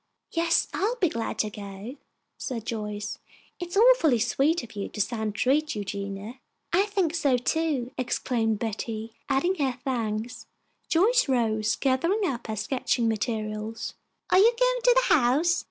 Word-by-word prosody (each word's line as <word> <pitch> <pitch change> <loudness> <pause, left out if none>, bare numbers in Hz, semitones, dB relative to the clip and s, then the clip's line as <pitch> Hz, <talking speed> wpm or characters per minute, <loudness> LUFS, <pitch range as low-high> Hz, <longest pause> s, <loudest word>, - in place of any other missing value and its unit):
"Yes, 335 0 +2
I'll 430 +6 0
be 370 -9 +1
glad 230 -5 -3
to 215 - 0
go," 200 +4 -8 0.4
said 230 -4 -5
Joyce. 210 -2 -4 0.4
"It 350 - -4
is 355 - -4
awfully 440 - +6
sweet 275 +7 +1
of 230 -2 -11
you 200 - -4
to - - -9
stand 220 0 -1
treat, 280 +7 +1
Eugenia." 200 +3 -5 0.3
"I 390 +4 +4
think 385 -6 0
so, 285 -6 +2
too," 270 -1 -1
exclaimed 230 -3 0
Betty, 225 0 -4 0.2
adding 345 +8 +2
her 260 -2 -1
thanks. 230 -3 -3 0.4
Joyce 435 - +3
rose, 220 -4 +1
gathering 335 +11 +1
up 255 -10 -3
her 220 - -3
sketching 230 +2 0
materials. 215 0 -3 0.4
"Are 370 - +6
you 445 +4 +7
going - - +2
to - - +5
the - - +5
house?" 300 +8 +3
245 Hz, 155 wpm, -26 LUFS, 220-335 Hz, 0.4 s, you